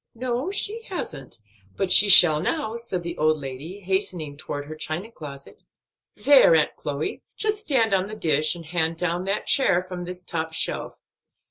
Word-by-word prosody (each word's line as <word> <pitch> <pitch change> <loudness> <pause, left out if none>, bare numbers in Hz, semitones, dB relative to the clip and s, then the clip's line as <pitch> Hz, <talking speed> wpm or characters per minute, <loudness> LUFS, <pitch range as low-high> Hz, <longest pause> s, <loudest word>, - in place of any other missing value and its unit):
"No, 250 +4 -3
so - - -3
she 430 +3 0
hasn't; 135 - -7 0.4
but 190 - -1
she 210 - +8
shall 175 -5 +9
now," 230 - -3
said 230 -7 -5
the 170 0 -6
old 155 0 +2
lady, 145 +8 -9
hastening 180 -6 -3
toward 145 -1 -7
her 155 - -9
china 165 +8 -5
closet. 140 -7 -11 0.5
"There, 275 - +5
Aunt 155 - +1
Chloe, 145 +1 -5 0.2
just 425 -1 -1
stand 240 - 0
on 190 0 0
the 215 - -8
dish, 155 -4 +1
and 170 -1 -11
hand 165 0 -1
down 175 +1 -2
that 200 +2 -2
chair 180 -10 +2
from 180 -1 -8
this 180 0 -8
top 160 -2 -4
shelf. - - -3
180 Hz, 175 wpm, -23 LUFS, 155-215 Hz, 0.5 s, shall